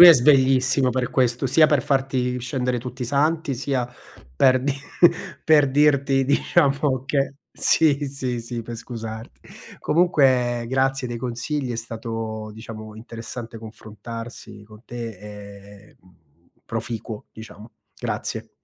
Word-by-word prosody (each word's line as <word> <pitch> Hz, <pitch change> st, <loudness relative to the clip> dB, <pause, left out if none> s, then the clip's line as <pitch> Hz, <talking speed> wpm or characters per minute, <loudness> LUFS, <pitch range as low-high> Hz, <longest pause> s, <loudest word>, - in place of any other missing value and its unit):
lui 175 Hz, -, +13 dB
è -, -, +12 dB
sveglissimo 130 Hz, -1 st, +4 dB
per 125 Hz, 0 st, -1 dB
questo, 125 Hz, 0 st, +1 dB
sia 155 Hz, +5 st, +5 dB
per 145 Hz, -4 st, +2 dB
farti 130 Hz, -2 st, 0 dB
scendere 125 Hz, 0 st, -1 dB
tutti 125 Hz, +1 st, -6 dB
i -, -, 0 dB
santi, 145 Hz, +2 st, +1 dB
sia 130 Hz, -1 st, -1 dB, 0.5 s
per 130 Hz, -, +4 dB
dir 140 Hz, -, +1 dB, 0.7 s
per 150 Hz, -3 st, +5 dB
dirti, 140 Hz, -2 st, +3 dB
diciamo 140 Hz, -2 st, +2 dB
che 140 Hz, -1 st, 0 dB, 0.2 s
sì, 145 Hz, -3 st, +3 dB
sì, 130 Hz, -3 st, -3 dB
sì 115 Hz, 0 st, -5 dB
per 115 Hz, +1 st, -7 dB
scusarti. 115 Hz, -1 st, -7 dB, 0.4 s
Comunque 130 Hz, -8 st, +3 dB
grazie 130 Hz, -1 st, 0 dB
dei 120 Hz, -, -4 dB
consigli, 125 Hz, +3 st, -3 dB
è 115 Hz, -, -3 dB
stato 115 Hz, -1 st, -5 dB
diciamo 110 Hz, -1 st, -9 dB
interessante 115 Hz, +1 st, -8 dB
confrontarsi 110 Hz, 0 st, -9 dB
con 110 Hz, +2 st, -16 dB
te 120 Hz, -1 st, -6 dB, 0.8 s
e, -, -, -24 dB
mhmm, 90 Hz, -1 st, -23 dB, 0.5 s
proficuo 115 Hz, -2 st, -5 dB
diciamo. 110 Hz, 0 st, -12 dB, 0.3 s
Grazie. -, -, -4 dB
125 Hz, 130 wpm, -23 LUFS, 115-135 Hz, 0.8 s, lui